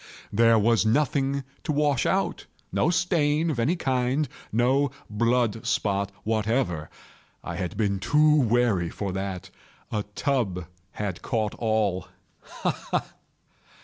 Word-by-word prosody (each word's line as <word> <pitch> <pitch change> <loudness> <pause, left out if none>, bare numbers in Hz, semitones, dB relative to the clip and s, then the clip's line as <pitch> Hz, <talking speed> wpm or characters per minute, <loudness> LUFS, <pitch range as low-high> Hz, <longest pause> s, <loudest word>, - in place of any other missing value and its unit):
There 115 +2 +5
was 115 +1 +3
nothing 140 +3 +1 0.2
to 155 - -1
wash 145 -3 +2
out—no 100 - -1
stain 165 -3 +2
of 130 - -3
any 145 +10 +2
kind—no 130 - 0 0.2
blood 115 0 +1
spot 100 -1 0
whatever. 110 -7 0 0.5
I 85 - -5
had 90 +1 -4
been 100 -3 +1
too 150 +8 +4
wary 115 -7 +2
for 100 +2 -4
that. 95 -1 -4 0.4
A 105 - 0
tub 105 -11 0 0.3
had 100 -4 -4
caught 110 -2 -1
all—ha! 110 -5 -2
ha! - - -3
115 Hz, 115 wpm, -26 LUFS, 100-140 Hz, 0.5 s, There